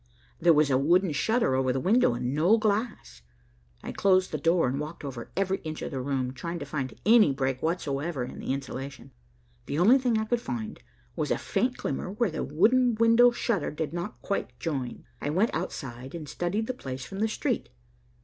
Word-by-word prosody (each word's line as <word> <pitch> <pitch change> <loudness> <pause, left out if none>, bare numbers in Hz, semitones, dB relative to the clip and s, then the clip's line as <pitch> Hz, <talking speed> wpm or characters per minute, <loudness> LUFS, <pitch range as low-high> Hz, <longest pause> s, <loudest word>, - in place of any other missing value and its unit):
There 175 - +5
was 150 -2 +4
a 130 - +4
wooden 175 +5 +3
shutter 220 - +1
over 130 0 +2
the 130 - -1
window, 195 - +3
and 125 +2 -2
no 170 +9 +4
glass. 215 - -2 0.6
I - - -5
closed 185 -1 +2
the 155 - -2
door 165 0 +3
and 135 +3 -1
walked 150 +2 -6
over 125 -4 -6
every 190 0 +1
inch 155 -1 -6
of - - -4
the 135 -2 -3
room, 130 -1 -2
trying 170 +7 -5
to 145 - -6
find 140 -2 -4
any 220 -7 +6
break 130 -1 -1
whatsoever 155 -3 -2
in 125 - -7
the - - -3
insulation. 135 0 -6 0.6
The 145 - -2
only 220 +11 +6
thing 245 -3 +1
I 220 - 0
could 235 +1 0
find 220 -3 -5 0.4
was - - -2
a - - +1
faint 250 0 -1
glimmer, 140 - -3
where 210 0 0
the - - -3
wooden 230 - +3
window 230 +2 +6
shutter 230 -7 -1
did 155 +1 -4
not 175 +4 -5
quite 200 - -3
join. 135 -7 -4 0.2
I - - -2
went 190 +10 +2
outside 130 +2 -5
and 155 -3 -6
studied 175 +9 -2
the 255 - -3
place 130 - -6
from 195 +8 -7
the 220 - +2
street. 215 - -2
165 Hz, 200 wpm, -27 LUFS, 135-215 Hz, 0.6 s, any